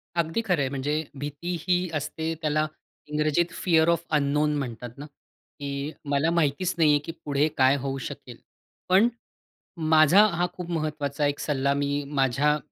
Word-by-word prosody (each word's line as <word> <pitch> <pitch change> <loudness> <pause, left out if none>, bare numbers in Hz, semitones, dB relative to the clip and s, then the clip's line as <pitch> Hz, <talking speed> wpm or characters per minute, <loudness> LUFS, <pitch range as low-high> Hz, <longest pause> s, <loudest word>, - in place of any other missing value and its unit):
अगदी 170 +5 0
खरं 180 -7 +1
आहे. 135 - 0
म्हणजे 145 +3 -1 0.2
भीती 145 +5 -4
ही 180 0 +1
असते 160 +2 -3
त्याला 155 0 +1 0.4
इंग्रजीत 150 +3 +1
फिअर 165 -2 +4
ऑफ 170 0 +1
अन्नोन 150 +1 +1
म्हणतात 120 -3 -6
ना? 145 - -7 0.5
की 140 +1 -4
मला 145 +3 +1
माहितीच 170 +2 +1
नाही 160 -3 +4
आहे 145 - +4
की - - -4
पुढे 145 0 +2
काय 130 +1 +5
होऊ 135 -1 -3
शकेल? - - -10 0.5
पण 190 +5 +6 0.8
माझा 160 +6 +7
हा 175 -3 0
खूप 180 -1 -7
महत्वाचा 150 -3 -2
एक 145 0 -2
सल्ला 140 -1 0
मी 145 0 -1
माझ्या 140 +1 +2
150 Hz, 155 wpm, -26 LUFS, 140-165 Hz, 0.8 s, माझा